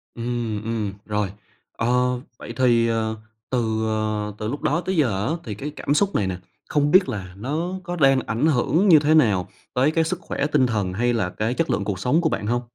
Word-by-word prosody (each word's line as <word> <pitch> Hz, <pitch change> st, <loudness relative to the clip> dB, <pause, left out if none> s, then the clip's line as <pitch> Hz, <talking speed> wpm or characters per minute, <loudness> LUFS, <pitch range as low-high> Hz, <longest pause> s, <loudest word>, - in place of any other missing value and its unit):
Ừm, 115 Hz, -3 st, -3 dB
ừm, 110 Hz, -3 st, -2 dB
rồi, 105 Hz, -2 st, -1 dB, 0.5 s
ờ, 115 Hz, -, 0 dB, 0.5 s
vậy -, -, -7 dB
thì, 120 Hz, -3 st, +3 dB
ờ, 110 Hz, -1 st, -1 dB, 0.3 s
từ, 110 Hz, -3 st, 0 dB
ờ, 110 Hz, -1 st, -1 dB
từ 105 Hz, -, -4 dB
lúc 140 Hz, +6 st, -4 dB
đó 165 Hz, +5 st, +1 dB
tới 190 Hz, +1 st, -2 dB
giờ 110 Hz, -8 st, +1 dB
á 160 Hz, -, 0 dB
thì 105 Hz, -4 st, -5 dB
cái 140 Hz, +8 st, -5 dB
cảm 145 Hz, -, -1 dB
xúc 200 Hz, +4 st, +1 dB
này 100 Hz, -, +1 dB
nè, 90 Hz, -1 st, -3 dB, 0.3 s
không 145 Hz, -1 st, +2 dB
biết 185 Hz, -5 st, +5 dB
là 95 Hz, -5 st, -5 dB
nó 155 Hz, -, -3 dB
có 175 Hz, 0 st, -4 dB
đang 135 Hz, -4 st, +4 dB
ảnh 115 Hz, +7 st, 0 dB
hưởng 160 Hz, +7 st, +2 dB
như 160 Hz, -5 st, +8 dB
thế 150 Hz, +1 st, +2 dB
nào 105 Hz, -, +3 dB, 0.3 s
tới 135 Hz, +4 st, +3 dB
cái 165 Hz, 0 st, +2 dB
sức 175 Hz, +2 st, -2 dB
khỏe 145 Hz, -, -2 dB
tinh 145 Hz, -4 st, +3 dB
thần 100 Hz, -5 st, -1 dB
hay 120 Hz, +4 st, +1 dB
là 110 Hz, -6 st, 0 dB
cái 110 Hz, +6 st, -2 dB
chất 165 Hz, +4 st, -1 dB
lượng 100 Hz, -, 0 dB
cuộc 95 Hz, -2 st, -3 dB
sống 145 Hz, +10 st, +2 dB
của 160 Hz, -, +2 dB
bạn 105 Hz, -, -2 dB
hông? 120 Hz, +2 st, +1 dB
120 Hz, 225 wpm, -23 LUFS, 105-150 Hz, 0.5 s, như